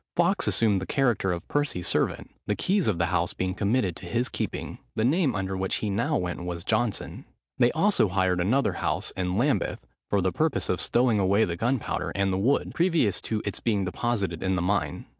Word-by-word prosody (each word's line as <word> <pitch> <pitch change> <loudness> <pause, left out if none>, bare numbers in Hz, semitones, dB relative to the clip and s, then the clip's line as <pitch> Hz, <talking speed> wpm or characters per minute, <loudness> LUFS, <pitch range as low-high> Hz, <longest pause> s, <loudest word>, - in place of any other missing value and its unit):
Fawkes - - +2
assumed 105 -4 +2
the 95 - -5
character 120 -8 +1
of 85 -1 -4
Percy's 145 -12 -1
servant, - - 0 0.2
the 105 - +1
keys 190 - +1
of 105 -6 +1
the 85 - +2
house 85 0 0
being 95 0 -1
committed 100 -2 0
to 90 - -9
his 120 +8 0
keeping. - - -4 0.2
The 110 - +1
name 150 - +2
under 95 -1 -2
which 95 0 -1
he 105 - -2
now 100 - 0
went 90 -1 -3
was 85 -1 -4
Johnson. 110 +1 -1 0.4
They 120 -1 +5
also 195 - +3
hired 95 -1 +1
another 130 +10 +2
house, - - -2
in 90 0 -2
Lambeth, 135 - 0 0.2
for 100 - +2
the 95 0 +1
purpose 150 - 0
of 90 - 0
stowing 120 -3 +2
away 100 +3 +3
the 85 - -3
gunpowder 120 +6 -1
and 100 -1 +1
the 95 - 0
wood, 130 +8 +1
previous 165 - +2
to 110 -1 -3
its 100 - -3
being 105 -5 0
deposited 95 -4 -2
in 95 0 0
the 90 - 0
mine. 100 +2 -1
100 Hz, 205 wpm, -26 LUFS, 95-120 Hz, 0.4 s, They